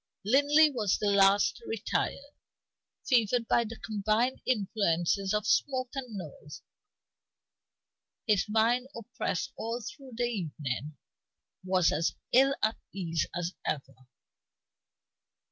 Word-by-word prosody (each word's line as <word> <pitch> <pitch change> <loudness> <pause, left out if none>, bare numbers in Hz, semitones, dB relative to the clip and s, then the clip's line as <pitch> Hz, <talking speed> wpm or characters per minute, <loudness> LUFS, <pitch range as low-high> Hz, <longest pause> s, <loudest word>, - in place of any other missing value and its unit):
Linley 290 +6 +5
was 215 -7 0
the 205 -1 +1
last 200 0 +4
to 235 - -14
retire 255 +5 -2 0.7
fevered 235 -2 +2
by 235 - +3
the 230 0 -7
combined 215 +4 0
influences 195 -4 +1
of 210 0 0
smoke 255 +1 +1
and 250 -6 -5
noise. 150 -4 -9 1.6
His 210 -2 +2
mind, 230 +4 +2
oppressed 230 -6 -4
all 230 +2 -3
through 260 +3 -10
the 240 - -1
evening, 155 - -3 0.7
was 185 -2 +2
as 165 +3 0 0.2
ill 270 +2 +5
at 220 +1 +2
ease 170 -4 -2
as 175 +1 -2
ever. 135 -3 -3
215 Hz, 110 wpm, -29 LUFS, 185-245 Hz, 1.6 s, Linley